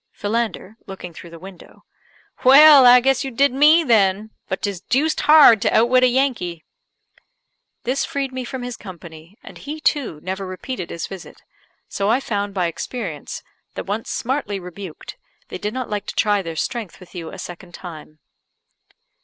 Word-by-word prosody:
Philander 220 -1 -3
(looking 185 -3 -9
through 170 - -12
the 170 - -11
window 185 +2 -14 0.3
): - - -28
"Well, 275 0 +8
I 245 0 +8
guess 270 +1 +1
you 270 - -4
did 270 +2 +2
me 305 +5 +5
then; 215 -4 +2 0.2
but 190 - -4
'tis 200 -4 -3
deuced 305 +5 0
hard 295 -8 +8
to - - +2
outwit 245 +3 +4
a - - +6
Yankee." 240 - -1 1.2
This 255 +3 -1
freed 275 -2 -3
me 255 0 -5
from 250 +1 -6
his 245 -1 -5
company, 170 -1 -12
and - - -12
he, 300 +2 -7
too, 275 - -1
never 190 +1 -4
repeated 185 +1 -6
his 170 - -5
visit; 195 -2 -11 0.4
so 200 +1 -2
I 240 - +3
found 205 -6 -3
by 180 -2 0
experience, 170 - -6 0.3
that - - -5
once 215 +5 -4
smartly 245 -6 -2
rebuked, 180 -2 -10 0.3
they 185 - -7
did 210 +2 -3
not 255 +1 -4
like 205 -1 -4
to - - -6
try 205 -2 +2
their 165 -3 -7
strength 220 +3 -4
with 185 -2 -16
you 165 -3 -7
a - - -10
second 175 0 -10
time. 155 -3 -11
210 Hz, 175 wpm, -20 LUFS, 185-255 Hz, 1.2 s, Well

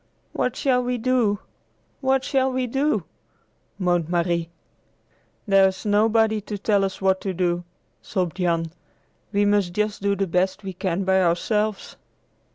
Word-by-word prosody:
"What 250 - -1
shall 250 -2 +1
we 245 0 -1
do? 235 -4 +1 0.6
What 265 -1 +1
shall 265 -1 +1
we 255 0 -1
do?" 275 +5 0 0.7
moaned 175 -3 0
Marie. 170 -1 0 1.0
"There's 195 -1 +3
nobody 220 +1 +3
to 205 0 -5
tell 200 0 +2
us 190 0 -3
what 190 0 +2
to 190 -2 -3
do," 175 -1 0 0.4
sobbed 180 -4 -2
Jan. 165 -3 0 0.6
"We 205 0 +2
must 205 -3 +2
just 210 +1 -1
do 200 0 +1
the 195 - 0
best 185 +3 0
we 190 -1 -5
can 180 +1 -2
by 190 0 +3
ourselves." 210 +4 0
200 Hz, 145 wpm, -23 LUFS, 180-220 Hz, 1.0 s, There's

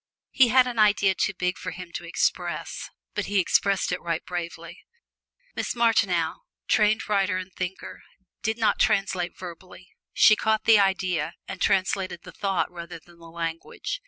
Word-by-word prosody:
He 260 - +5
had 255 +2 +5
an 245 -2 -4
idea 205 -2 +4
too 195 +1 -1
big 180 0 -2
for 185 - -4
him 180 0 -9
to - - -5
express, 170 - -2 0.2
but - - -2
he 205 - 0
expressed 195 +1 +2
at 180 - 0
it - - -23
right 170 -1 -3
bravely. 170 0 -6 0.8
Miss - - -2
Martineau, 200 -8 +2 0.3
trained 215 0 +2
writer 195 -2 +1
and 185 0 -7
thinker, 185 +1 -6 0.4
did 220 +1 -1
not 220 -3 +1
translate 185 -3 +1
verbally: 180 0 -11 0.2
she 215 - +6
caught 220 0 0
the 225 -2 +6
idea, 185 -5 0
and 190 0 -7
translated 185 -2 0
the - - -10
thought 195 -3 -1
rather 170 -1 -8
than 170 +1 -20
the 165 - -13
language. 165 - -5
185 Hz, 165 wpm, -25 LUFS, 175-205 Hz, 0.8 s, she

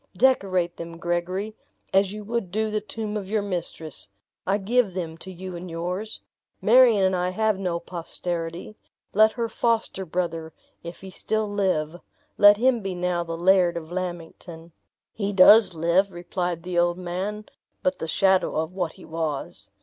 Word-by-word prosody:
Decorate 185 -8 +2
them, 170 0 -7
Gregory, 180 +5 -2 0.4
as 195 0 +3
you 210 0 -7
would 230 -3 -2
do 215 +3 -1
the 215 0 -1
tomb 215 0 -5
of 200 -3 -4
your 215 -1 0
mistress. 170 -5 -5 0.4
I 195 +2 +3
give 210 -1 +1
them 165 -3 -4
to 190 - -8
you 185 0 -7
and 175 +1 -7
yours. 180 +6 -4 0.4
Marion 235 -3 +6
and 190 0 +3
I 180 0 0
have 215 +1 0
no 180 -3 -1
posterity! 170 +2 -5 0.4
Let 215 +1 +5
her 235 -1 -2
foster 225 -4 0
brother, 165 -2 -3 0.3
if 170 +1 -9
he 190 0 -9
still 215 +3 -1
live 185 -6 0 0.4
let 205 0 +7
him 245 0 +2
be 195 -2 -4
now 175 -1 -1
the 165 -1 -5
Laird 180 -1 +4
of 160 0 -7
Lammington." 175 -2 -6 0.4
"He 200 -2 -2
does 190 0 +7
live," 170 +5 +2
replied 175 -1 -3
the 180 -1 -1
old 175 0 +2
man, 185 +4 -4 0.4
"but 275 0 0
the 160 - -4
shadow 190 +3 +2
of 160 +3 -2
what 180 -3 -2
he - - -14
was. 160 -3 -4
185 Hz, 165 wpm, -25 LUFS, 170-210 Hz, 0.4 s, let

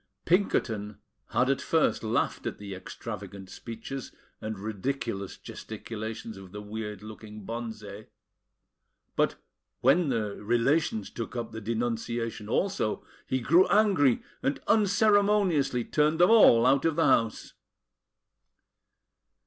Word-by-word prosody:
Pinkerton 110 - +1 0.3
had 125 - +1
at 135 - -1
first 160 -7 +1
laughed 110 - -1
at - - -4
the 100 -1 -7
extravagant 100 0 -8
speeches 115 +5 -7 0.3
and 110 -1 -4
ridiculous 105 0 -4
gesticulations 110 0 -7
of 95 -2 -12
the 105 - -7
weird 105 -1 -6
looking 110 -1 -10
Bonze; 110 -2 -6 1.1
but - - +2 0.5
when 145 +5 +4
the 105 -4 -2
relations 120 -1 +1
took 115 +1 -6
up 120 -1 -4
the 110 - -7
denunciation 115 -1 -3
also, 190 - 0 0.2
he 130 - 0
grew 170 +9 +5
angry, 195 - +3 0.2
and 135 - 0
unceremoniously 200 - +3
turned 150 +1 +2
them 175 +4 +6
all 120 - +7
out 135 +1 +4
of 165 -2 +1
the 165 - +3
house. 115 -1 +1
115 Hz, 115 wpm, -28 LUFS, 105-145 Hz, 1.1 s, all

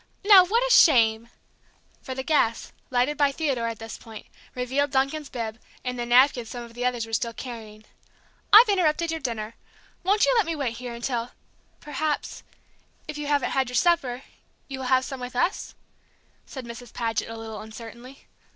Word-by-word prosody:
Now, 400 -3 +9
what 460 +7 +1
a - - +4
shame!" 230 -6 +5 0.7
for 260 - -6
the 265 - -4
gas, 235 -7 +1 0.2
lighted 255 +4 +1
by 285 -1 +3
Theodore 275 -6 -1
at 230 -1 -4
this 225 0 -8
point, 220 -2 -11 0.3
revealed 260 +3 0
Duncan's 275 +2 -1
bib, 230 -2 -5 0.3
and 250 -1 -3
the 240 - -3
napkins 245 -1 +4
some 240 0 -6
of 235 -1 -13
the 245 +1 -5
others 245 -2 0
were 225 - -12
still 230 +1 -1
carrying. 220 -4 -9 0.7
"I've 440 +4 +10
interrupted 335 -4 +1
your 325 - -3
dinner! 230 -5 -4 0.5
Won't 405 +3 +3
you - - +3
let 425 -6 +2
me 330 - -2
wait 250 -6 -3
here 245 -1 -6
until 235 0 -3 0.2
" - - -39
"Perhaps 300 0 -3 0.7
if 295 - -6
you 295 - -4
haven't 285 -1 +1
had 265 -2 0
your 250 - -6
supper 265 -5 +1 0.4
you 270 -1 -6
will 260 - -4
have 260 0 +3
some 270 -2 -6
with 250 0 -7
us," 355 +10 -1 0.7
said 265 -3 -8
Mrs. 235 0 -10
Paget, 225 -3 -2
a 225 - -7
little 220 -1 -7
uncertainly. 230 +4 -11
250 Hz, 185 wpm, -25 LUFS, 230-295 Hz, 0.7 s, I've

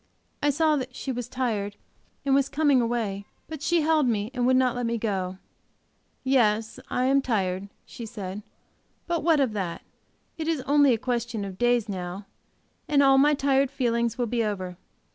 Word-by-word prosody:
I 290 - +3
saw 305 +1 +2
that 255 -2 -5
she 270 - -4
was 245 -1 -4
tired 220 -6 -2 0.5
and 275 - +2
was 275 0 +3
coming 285 -4 +3
away, 220 -4 -2 0.2
but 315 -2 -7
she 340 +2 +2
held 310 -3 +3
me 215 -1 -1
and 250 -2 0
would 260 - +4
not 255 -1 +3
let 245 -1 -1
me 235 0 -1
go. 190 -4 -2 0.9
"Yes, 225 -5 +2
I 250 - 0
am 275 +1 +4
tired," 195 -6 -1 0.2
she 230 - -8
said, 200 -2 -6 0.6
"but 340 -2 -1
what 320 -1 +3
of 260 -6 +1
that? 185 -5 -4 0.6
It 315 - -3
is 325 -4 0
only 285 -1 +4
a - - -3
question 240 -3 -2
of 190 -1 -8
days 240 -2 +2
now, 185 0 -5 0.6
and 285 -2 +4
all 270 -1 +6
my 295 +2 +5
tired 275 -1 +2
feelings 235 -3 0
will 245 - 0
be 235 0 0
over. 185 -4 -3
245 Hz, 180 wpm, -26 LUFS, 210-275 Hz, 0.9 s, all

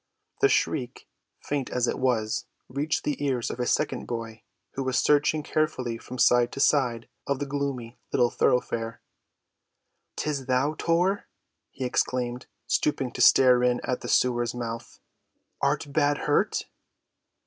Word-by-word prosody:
The 410 - +5
shriek, 130 - -1 0.4
faint 140 -3 -2
as 125 -1 0
it - - -2
was, 115 -4 0 0.2
reached 145 +4 -2
the 145 -1 -2
ears 130 -4 0
of - - -7
a 125 - -1
second - - 0
boy, 115 -1 -5 0.3
who 135 - -4
was 130 -1 0
searching 150 +1 +3
carefully 130 -7 -1
from 125 - -9
side 120 -1 +4
to - - -6
side 125 -5 +2 0.2
of 140 - 0
the 145 - -3
gloomy 135 -4 -4
little 120 -1 +3
thoroughfare. 115 -2 0 1.2
"'Tis 140 -4 -3
thou, 130 +4 +2
Tor," 175 +5 +1 0.4
he 130 - -5
exclaimed, 125 0 -1 0.2
stooping 135 -4 0
to - - -4
stare 125 -2 +6
in 125 0 +2
at 125 -2 -2
the - - -6
sewer's 120 -1 +2
mouth. 115 -1 -6 0.6
"Art 140 +1 +1
bad 145 0 +1
hurt?" - - +1
130 Hz, 145 wpm, -26 LUFS, 120-145 Hz, 1.2 s, stare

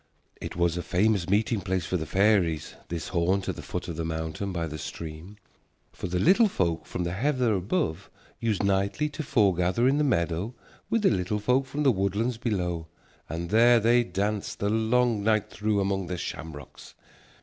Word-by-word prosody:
It - - -6
was 85 0 +1
a - - -1
famous 95 +1 +1
meeting 105 +2 +1
place 95 -1 -1
for 95 - -2
the 80 -3 -2
fairies, 95 -6 +2
this 85 -2 -4
haunt 95 +2 +1
at - - -2
the - - -7
foot - - -5
of 80 - -5
the 85 - -2
mountain 80 +4 -3
by 85 -2 -2
the 75 -1 -6
stream, 80 +7 -8 0.5
for - - -6
the 90 +1 -1
Little 195 - +5
Folk 85 - -1
from 90 - -3
the 85 - -2
heather 125 +1 +1
above 100 - -1 0.3
used 110 -4 0
nightly 100 +9 +1
to 150 - -5
foregather 105 - +2
in 140 +2 +3
the - - +3
meadow 95 - 0 0.3
with 225 -1 +1
the - - +5
Little 95 +1 0
Folk 125 +5 +1
from 145 +3 -2
the 135 - +5
woodland 110 +4 -1
below, 90 -8 -2 0.4
and 85 +2 -4
there 120 +2 +6
they 120 +2 +4
danced 100 +1 -2
the 100 +1 0
long 110 0 +2
night 110 -1 +1
through 105 -1 0
among 95 -1 -1
the 90 0 -3
shamrocks. 75 -5 -8
100 Hz, 185 wpm, -27 LUFS, 85-115 Hz, 0.5 s, there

